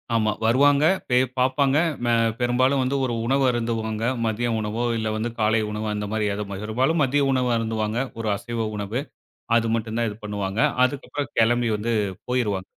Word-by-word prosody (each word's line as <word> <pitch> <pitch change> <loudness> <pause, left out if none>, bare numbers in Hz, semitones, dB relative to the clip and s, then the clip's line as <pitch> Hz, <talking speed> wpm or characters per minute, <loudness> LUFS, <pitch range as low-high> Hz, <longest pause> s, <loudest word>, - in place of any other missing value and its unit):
ஆமா 110 -1 +2
வருவாங்க. 140 +5 +4 0.2
பெ 125 - +4 0.2
பாப்பாங்க. 135 +2 +2 0.3
ம - - -1 0.3
பெரும்பாலும் 130 +3 +2
வந்து 130 +2 -1
ஒரு 120 - -2
உணவு 135 +3 +2
அருந்துவாங்க. 115 -2 -2 0.2
மதிய 115 +2 -1
உணவோ, 110 +2 -2
இல்ல 110 -1 -2
வந்து 110 +2 -2
காலை 110 +1 +3
உணவோ, 105 +1 -3
அந்த 105 0 -3
மாரி 110 -1 0
ஏதோ, 105 +1 -4 0.2
பெரும்பாலும் 130 +9 +1
மதிய 140 +2 +2
உணவு 125 -2 +1
அருந்துவாங்க. 110 0 -1 0.2
ஒரு 110 -1 -2
அசைவ 115 0 -3
உணவு. 105 +5 -3 0.6
அது 115 -1 +2
மட்டும் 110 -1 -2
தான் 115 -1 +1
இது 105 - -6
பண்ணுவாங்க. 100 0 -3 0.2
அதுக்கப்றம் 140 0 -3
கெளம்பி 120 +1 +3
வந்து, 110 +3 -3 0.4
போயிருவாங்க. 105 -7 0
115 Hz, 165 wpm, -24 LUFS, 110-130 Hz, 0.6 s, வருவாங்க